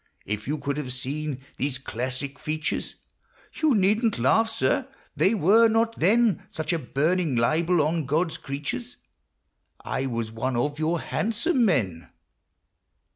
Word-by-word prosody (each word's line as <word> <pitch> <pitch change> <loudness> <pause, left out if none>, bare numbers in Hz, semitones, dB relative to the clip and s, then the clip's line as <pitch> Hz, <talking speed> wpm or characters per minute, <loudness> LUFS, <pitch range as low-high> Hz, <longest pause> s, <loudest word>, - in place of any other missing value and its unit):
If 105 +2 -4
you 150 +2 -1
could 140 -1 -3
have 135 -4 -3
seen 135 +2 -4 0.2
these 135 -1 -1
classic 130 +2 -4
features, 155 0 -3 0.3
— - - -32
You 305 -5 +4
needn't 215 +3 +2
laugh, 225 - +3
sir; 255 +4 0 0.3
they 200 +4 +3
were 215 +5 +5
not 225 +1 +2
then 215 +2 +3
Such 155 +2 -2
a 170 - 0
burning 155 +3 0
libel 160 +8 +2
on 155 -1 -1
God's 160 +4 0
creatures; 145 - -5 0.8
I 135 - -3
Avas 115 -3 -3
one 125 +3 -2
of 145 +5 -1
your 165 +2 +1
handsome 235 - 0
men 95 - 0
155 Hz, 140 wpm, -25 LUFS, 130-210 Hz, 0.8 s, were